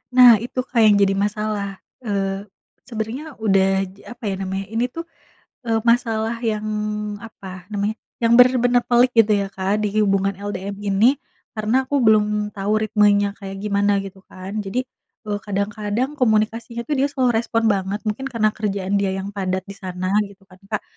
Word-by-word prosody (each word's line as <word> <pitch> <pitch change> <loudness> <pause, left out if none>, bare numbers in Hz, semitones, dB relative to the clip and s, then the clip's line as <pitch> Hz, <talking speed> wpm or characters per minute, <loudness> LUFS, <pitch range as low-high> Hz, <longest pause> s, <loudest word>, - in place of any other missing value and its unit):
Nah 245 -4 +9
itu 250 +1 -5
Kak 250 -2 -2
yang 210 -1 +6
jadi 200 -1 +3
masalah. 210 -1 -2 0.4
Eee, 195 -1 -2 0.4
sebenarnya 250 +6 -5
udah 195 -2 +4 0.3
j - - -23
apa 240 0 -11
ya 195 - -2
namanya 195 0 -3
ini 230 +2 +1
tuh, 330 +7 -7 0.6
eee, 225 -1 +2
masalah 230 -1 +1
yang, 215 -2 -1 0.6
apa 225 -4 -11 0.2
namanya, 205 +1 -1 0.3
yang 230 0 +4
benar-benar 245 -1 +5
pelik 245 0 +4
gitu 225 -2 +5
ya 200 - -1
Kak 195 +2 0
di 210 - +1
hubungan 195 -1 +1
LDM 200 0 -5
ini, 200 +2 +3 0.5
karena 225 +5 +1
aku 285 - -4
belum 210 -1 +3
tahu 200 +1 -2
ritmenya 205 -1 +3
kayak 195 -1 -7
gimana, 205 0 +1
gitu 195 -1 -10
kan. 190 +3 -7
Jadi, 245 +7 -1 0.4
eee, 205 -1 -2
kadang-kadang 210 +5 -1
komunikasinya 230 0 0
tuh 300 - +1
dia 275 - +3
slow 255 -3 +2
respond 225 -1 +1
banget. 195 +1 -1
Mungkin 265 +6 -3
karena 230 -4 +1
kerjaan 200 -2 -1
dia 195 -1 0
yang 195 +1 -4
padat 190 -2 -2
di - - -7
sana, 185 0 -4 0.2
gitu 200 0 -17
kan 185 - -17
Kak, 210 +1 -3
210 Hz, 170 wpm, -21 LUFS, 200-230 Hz, 0.6 s, Nah